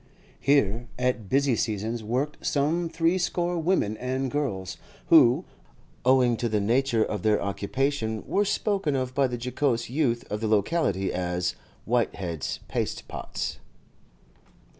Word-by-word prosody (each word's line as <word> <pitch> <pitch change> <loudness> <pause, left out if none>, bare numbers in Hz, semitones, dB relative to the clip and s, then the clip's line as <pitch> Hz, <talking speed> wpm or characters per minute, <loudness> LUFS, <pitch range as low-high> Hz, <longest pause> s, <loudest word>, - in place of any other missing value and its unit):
Here 120 -5 +2
at 125 -5 -1
busy 135 -2 +3
seasons 110 +1 -2
worked 130 +7 -2
some 160 +4 +1
threescore 175 +1 0
women 155 - +1
and 130 +1 -2
girls, 100 -11 -2 0.3
who, - - +6 0.6
owing 125 -2 +4
to 120 - -1
the 105 -1 +1
nature 115 +2 +2
of 105 - -3
their 105 -1 +3
occupation, 110 +3 -1
were 205 - +1
spoken 200 -6 0
of 130 -1 -2
by 135 0 +3
the 125 -1 -4
jocose 125 -1 -1
youth 130 -5 0
of 105 +1 -2
the 110 - 0
locality 105 - +1
as 90 0 -1 0.3
'Whitehead's 95 - -1
pastepots. - - -4
125 Hz, 125 wpm, -26 LUFS, 110-145 Hz, 0.6 s, who